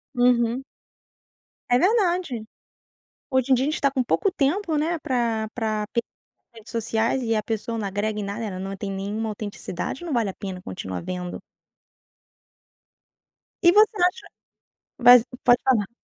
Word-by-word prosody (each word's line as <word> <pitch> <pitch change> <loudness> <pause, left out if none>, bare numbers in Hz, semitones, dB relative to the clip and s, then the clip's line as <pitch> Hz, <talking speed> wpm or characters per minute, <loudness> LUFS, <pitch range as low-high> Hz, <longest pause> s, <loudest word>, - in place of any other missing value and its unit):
Uhum. 245 +1 +2 1.1
É 245 - +5
verdade. 360 - +1 0.9
Hoje 260 -1 +1
em 260 - +8
dia 255 - +1
a - - +1
gente 310 - 0
está 275 - +1
com 260 -1 0
pouco 390 - +1
tempo, 330 +3 0
né, 330 +3 0
pra 235 -6 -1
pra 215 -3 -1
p 235 - +2 0.5
redes 225 +2 -13
sociais, 230 +2 0
e 225 -2 +1
pessoa 225 +1 -3
não 205 -2 -2
agrega 210 +2 -2
em - - -3
nada, 200 +2 -4
né, 225 - -2
ela 185 -2 -5
não 195 +1 -4
tem 195 0 -5
nenhuma 205 +3 -3
autenticidade, 205 - -5
não 330 - -3
vale 230 -5 +1
a 190 - -5
pena 185 -2 -7
continuar 95 -1 -5
vendo. 180 -1 -5 2.2
E 345 - +7
você 425 +2 +5
acha 360 +5 +1 0.8
mas 245 -1 +9 0.2
pode 245 0 +5
falar. 235 -7 +2
230 Hz, 155 wpm, -24 LUFS, 210-270 Hz, 2.2 s, mas